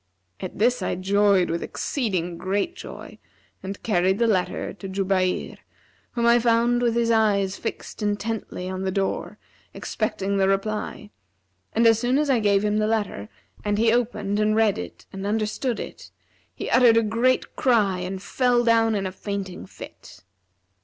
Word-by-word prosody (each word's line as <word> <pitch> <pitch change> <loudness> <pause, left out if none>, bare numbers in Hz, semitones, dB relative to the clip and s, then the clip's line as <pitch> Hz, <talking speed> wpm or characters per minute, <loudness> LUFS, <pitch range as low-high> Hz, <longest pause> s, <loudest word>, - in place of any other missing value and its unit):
At 185 - -6
this 245 +4 +2
I - - -1
joyed 195 -1 +3
with 170 - -2
exceeding 185 - -2
great 200 - -2
joy - - -10 0.4
and 195 +1 -7
carried 190 -2 +2
the 235 - +2
letter 190 -5 0
to 195 -1 -8
Jubayr, 190 -1 0 0.6
whom 235 -1 0
I 235 +1 +6
found 235 +1 +2
with 235 -1 +1
his 235 -1 +2
eyes 205 -4 +2
fixed - - -6
intently 205 -2 -3
on 185 0 -4
the 190 - -1
door, 195 0 -2 0.4
expecting 200 +1 -2
the 190 -1 +3
reply 210 +1 -2 0.6
and 230 +1 +3
as 225 -1 +5
soon 245 +3 +1
as 295 -1 +2
I 250 - +3
gave 205 -1 +2
him 210 0 +1
the 215 - +1
letter 205 - -2 0.3
and 205 0 0
he 225 +1 +3
opened 210 -4 0
and 215 0 +2
read 220 -2 +2
it 90 -1 -8
and 195 +1 -4
understood 220 +3 -1
it, - - -8 0.4
he - - -6
uttered 240 -3 +6
a 230 - +4
great 230 +4 +1
cry 210 -8 +2
and 185 +1 -5
fell 245 0 +2
down 225 -1 +3
in 195 -1 -1
a 185 - -2
fainting 190 - -5
fit. - - -12
210 Hz, 165 wpm, -24 LUFS, 190-230 Hz, 0.6 s, I